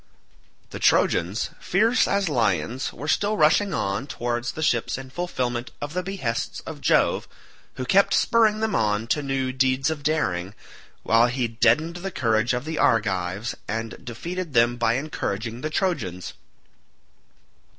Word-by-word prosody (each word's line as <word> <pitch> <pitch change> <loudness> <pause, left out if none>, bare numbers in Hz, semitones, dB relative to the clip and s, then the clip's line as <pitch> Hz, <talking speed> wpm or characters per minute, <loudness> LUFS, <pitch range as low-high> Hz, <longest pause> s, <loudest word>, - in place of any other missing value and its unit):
The - - -6
Trojans, 95 +8 +2
fierce 225 +6 +2
as 200 -1 +1
lions, 125 -2 0
were 145 - -8
still 205 +6 +1
rushing 185 +6 +4
on 100 +7 -2
towards 120 -2 -3
the 160 - -4
ships 120 -6 +1
in 130 -1 -9
fulfilment 125 -8 -3
of 145 +1 -5
the 180 - -1
behests 180 -12 -3
of - - -9
Jove - - +2 0.5
who 130 - -4
kept 195 +9 +4
spurring 220 -2 +3
them 220 -2 0
on 105 0 +1
to 150 - +1
new 135 -2 -1
deeds 130 +2 +1
of 155 -2 -4
daring, 105 - -1 0.5
while 115 +1 +4
he 125 0 -1
deadened 120 +9 +2
the 190 +2 -4
courage 115 -5 +1
of 125 +3 -4
the 160 0 -3
Argives 100 -2 +1
and 115 0 -4
defeated 170 +7 -5
them 120 0 +4
by 120 -1 +1
encouraging 120 -5 -3
the 155 - -2
Trojans. 130 - -2
130 Hz, 150 wpm, -24 LUFS, 115-160 Hz, 0.5 s, rushing